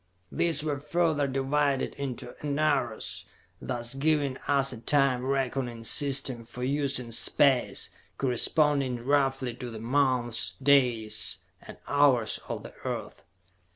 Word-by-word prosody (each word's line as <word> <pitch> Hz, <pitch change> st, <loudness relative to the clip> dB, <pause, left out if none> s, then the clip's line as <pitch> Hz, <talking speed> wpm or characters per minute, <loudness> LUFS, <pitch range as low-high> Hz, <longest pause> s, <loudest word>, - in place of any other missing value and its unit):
These 160 Hz, -3 st, +2 dB
were 145 Hz, -3 st, -2 dB
further 155 Hz, -1 st, 0 dB
divided 135 Hz, +1 st, 0 dB
into 130 Hz, -3 st, -6 dB
enaros, 145 Hz, -6 st, -1 dB, 0.4 s
thus 120 Hz, 0 st, -3 dB
giving 145 Hz, -1 st, +1 dB
us 135 Hz, -2 st, +2 dB
a 120 Hz, -, -8 dB
time 135 Hz, -2 st, +2 dB
reckoning 130 Hz, -3 st, -2 dB
system 135 Hz, -2 st, +1 dB
for 120 Hz, +2 st, -8 dB
use 140 Hz, +1 st, +1 dB
in 120 Hz, -2 st, -5 dB
space, 130 Hz, +2 st, +2 dB, 0.3 s
corresponding 135 Hz, -1 st, +2 dB
roughly 135 Hz, -2 st, +1 dB
to 125 Hz, +1 st, -7 dB
the 115 Hz, -2 st, -8 dB
months, 125 Hz, -1 st, 0 dB
days 125 Hz, -6 st, +2 dB, 0.2 s
and -, -, -11 dB
hours 140 Hz, -6 st, +3 dB
of -, -, -4 dB
the -, -, -10 dB
Earth. -, -, -5 dB
135 Hz, 120 wpm, -28 LUFS, 125-145 Hz, 0.4 s, hours